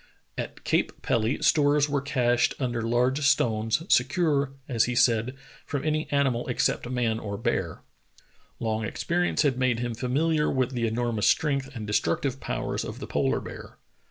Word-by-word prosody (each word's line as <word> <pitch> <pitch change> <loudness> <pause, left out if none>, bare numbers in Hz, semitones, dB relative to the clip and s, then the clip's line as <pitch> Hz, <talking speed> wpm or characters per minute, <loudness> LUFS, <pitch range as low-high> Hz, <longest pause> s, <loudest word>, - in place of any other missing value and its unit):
At - - -6
Cape - - -1
Pelly 115 +6 0
stores 145 -1 +4
were 140 -1 0
cached 125 -4 +1
under 120 -3 -1
large 125 +5 +1
stones, 115 -2 +2
secure, 140 0 +2
as 120 -5 +2
he 125 - -2
said, 120 +1 +2 0.3
from 145 -1 -4
any 155 0 -1
animal 135 -4 +1
except 125 0 0
man 120 -3 0
or 100 -2 -5
bear. - - -2 0.8
Long 110 -1 -1
experience 175 +10 0
had 135 -4 +1
made 130 -2 +2
him 120 0 -3
familiar 150 +6 +1
with 130 -1 0
the 120 -3 -1
enormous 115 -1 0
strength 140 -3 +1
and 110 -3 -5
destruc 95 -5 0
tive 135 -1 -2
powers - - -3
of - - -6
the - - -6
polar - - 0
bear. - - -10
125 Hz, 160 wpm, -26 LUFS, 115-140 Hz, 0.8 s, stores